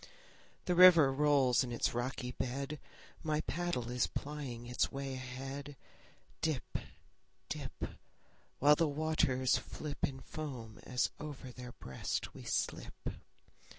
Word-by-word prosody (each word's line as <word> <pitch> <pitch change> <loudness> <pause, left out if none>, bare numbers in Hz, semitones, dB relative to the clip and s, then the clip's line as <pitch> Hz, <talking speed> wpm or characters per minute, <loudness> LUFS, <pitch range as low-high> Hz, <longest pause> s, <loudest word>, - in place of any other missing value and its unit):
The 180 - +2
river 170 -6 +9
rolls 140 -3 +4
in 125 - -4
its 120 - +1
rocky 125 +1 -2
bed; 140 +4 -3 0.4
My 155 -1 +1
paddle 170 -10 -2
is 125 0 +2
plying 140 -5 -5
its 125 +1 +1
way 135 0 -3
ahead; 135 +3 -6 0.7
Dip, 155 -5 -1 0.7
dip, - - -5 0.7
While 145 +2 +7
the 165 +1 +3
waters 145 -4 +2
flip 150 -2 -6
In 135 -1 0
foam 130 -8 -6
as 125 0 +1
over 140 -4 -6
their 125 0 -8
breast 65 - -3
we - - -9
slip. - - -2
135 Hz, 120 wpm, -35 LUFS, 125-150 Hz, 0.7 s, river